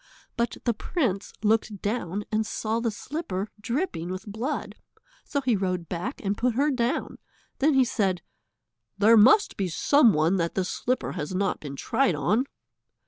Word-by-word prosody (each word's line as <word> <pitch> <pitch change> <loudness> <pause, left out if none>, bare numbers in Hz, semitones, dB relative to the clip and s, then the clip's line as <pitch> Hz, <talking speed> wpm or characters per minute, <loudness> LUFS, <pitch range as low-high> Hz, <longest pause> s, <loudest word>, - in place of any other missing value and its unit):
But 235 0 -1
the 235 - +2
prince 210 - -2
looked 215 -1 +1
down 205 -2 -2
and 215 0 +2
saw 220 +1 -2
the 235 0 0
slipper 210 - -4
dripping 230 - -2
with 185 +1 -5
blood, 225 +8 -3 0.5
so 285 - -2
he 250 -4 +2
rode 185 -3 -2
back 185 +10 -4
and 200 +1 +1
put 240 +2 0
her 290 +4 +2
down. 245 -1 -1 0.4
Then 290 +1 +3
he 265 -1 +5
said, 190 -7 0 0.7
"There 215 +3 +6
must 255 - +6
be 195 - 0
some 240 - +4
one 160 +5 +2
that 170 -1 -1
the 190 - +1
slipper 250 +6 -2
has 150 +5 -4
not 195 +1 0
been 140 -2 -7
tried 190 - +1
on." 210 - +1
215 Hz, 165 wpm, -26 LUFS, 185-250 Hz, 0.7 s, There